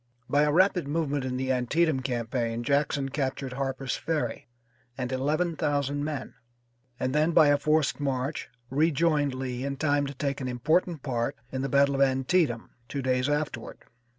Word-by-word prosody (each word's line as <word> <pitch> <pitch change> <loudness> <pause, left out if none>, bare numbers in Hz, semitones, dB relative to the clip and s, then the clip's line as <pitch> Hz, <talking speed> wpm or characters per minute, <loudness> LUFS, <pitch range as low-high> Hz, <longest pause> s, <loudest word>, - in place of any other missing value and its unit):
By 145 +3 +3
a 150 - +2
rapid 180 -1 +3
movement 145 -3 -1
in 125 -1 -2
the 130 0 -1
Antietam 135 +4 +2
campaign 120 -2 -2
Jackson 140 +1 +1
captured 135 -1 -3
Harper's 135 0 -2
Ferry 150 -8 -2 0.5
and 125 -1 -3
eleven 155 +6 0
thousand 145 -1 0
men, 145 -3 -4 0.7
and 130 - -1
then, 155 +3 +2
by 155 -3 +6
a 145 - +5
forced 150 -4 +1
march, 135 +1 -2 0.2
rejoined 150 -1 +2
Lee 130 -1 -4
in 140 0 -3
time 145 -1 +1
to 140 - -7
take 140 +1 -2
an 130 - -2
important 155 +5 0
part 120 -4 -1 0.2
in 130 - -2
the 135 - -2
battle 140 +1 +4
of 135 - 0
Antietam 135 -1 +2 0.2
two 140 +2 -4
days 130 +1 +1
afterward. 145 -5 -2
140 Hz, 165 wpm, -27 LUFS, 130-150 Hz, 0.7 s, by